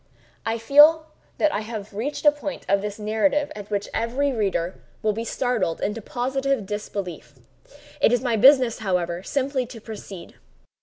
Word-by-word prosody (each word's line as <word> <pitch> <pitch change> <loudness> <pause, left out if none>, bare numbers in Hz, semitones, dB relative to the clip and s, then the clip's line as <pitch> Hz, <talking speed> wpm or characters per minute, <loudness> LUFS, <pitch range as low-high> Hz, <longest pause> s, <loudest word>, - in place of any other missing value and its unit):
I 225 - +1
now 230 - -7
feel 300 +6 +6 0.3
that 310 - +2
I - - 0
have 215 -2 -7
reached 265 +10 -4
a 295 - +8
point 290 0 -6
of 200 0 +2
this 205 0 -5
narrative 220 +8 0
at 205 -1 -9
which 205 -1 -2
every 255 +5 0
reader 190 -6 -1 0.2
will 215 -1 +2
be 225 +2 -4
startled 240 -7 -1
into 215 +2 -2
positive 265 +1 -1
disbelief. 200 -3 -6 0.7
It - - +5
is 245 -1 +2
my 240 -3 +1
business, 255 0 +5
however, 180 -4 -1
simply 270 +2 -1
to 235 -1 -10
proceed. 205 -4 -9
225 Hz, 165 wpm, -24 LUFS, 205-270 Hz, 0.7 s, a